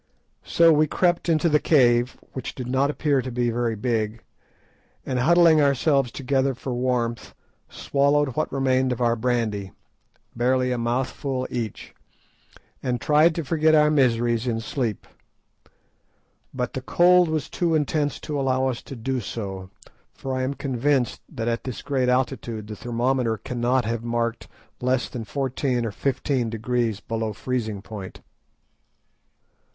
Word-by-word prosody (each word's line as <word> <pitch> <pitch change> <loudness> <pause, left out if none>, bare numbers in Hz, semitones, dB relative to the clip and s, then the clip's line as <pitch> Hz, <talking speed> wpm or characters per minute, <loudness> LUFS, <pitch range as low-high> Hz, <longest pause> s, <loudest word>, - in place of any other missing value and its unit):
So 165 -1 +5
we 155 +1 +3
crept 175 +2 +1
into 165 +1 +3
the 150 -2 +3
cave, 125 -5 +3 0.2
which 130 - -6
did 130 - -5
not 135 +2 +1
appear 145 -2 +1
to 130 - -5
be 120 0 0
very 115 -1 -1
big, 110 -1 -2 0.8
and 130 -1 -1
huddling 165 +2 +5
ourselves 140 -2 +2
together 135 0 0
for 130 +1 -5
warmth, 120 -2 -2 0.3
swallowed 145 +1 +1
what 155 - -1
remained 130 -1 +1
of 125 - -2
our 120 -1 +2
brandy—barely 120 +2 -2
a 125 - 0
mouthful 130 +2 -2
each—and 120 +2 -7
tried 155 +4 +4
to 165 - -2
forget 155 +2 +3
our 150 0 +5
miseries 120 -4 +2
in 115 -2 0
sleep. 115 -2 -3 1.5
But 125 -2 -3
the 130 - -4
cold 175 +5 +4
was 155 -2 -1
too 170 -2 0
intense 150 -1 0
to 150 -2 -3
allow 130 -1 +1
us 120 -2 -4
to 135 - -9
do 130 +2 -2
so, 95 -4 -6 0.5
for 135 - -5
I 130 - -1
am 130 +2 -2
convinced 135 -1 0
that 120 -7 -4
at 115 0 -1
this 130 -3 -6
great 130 -3 0
altitude 120 -4 -1
the 105 0 -7
thermometer 120 0 0
cannot 125 +2 0
have 115 0 -2
marked 115 0 -2 0.3
less 125 0 +1
than 115 -3 -6
fourteen 130 0 -1
or 110 - -2
fifteen 130 0 -1
degrees 115 -1 -1
below 110 -1 -3
freezing 110 -4 -3
point. 100 -4 -9
125 Hz, 145 wpm, -24 LUFS, 115-140 Hz, 1.5 s, So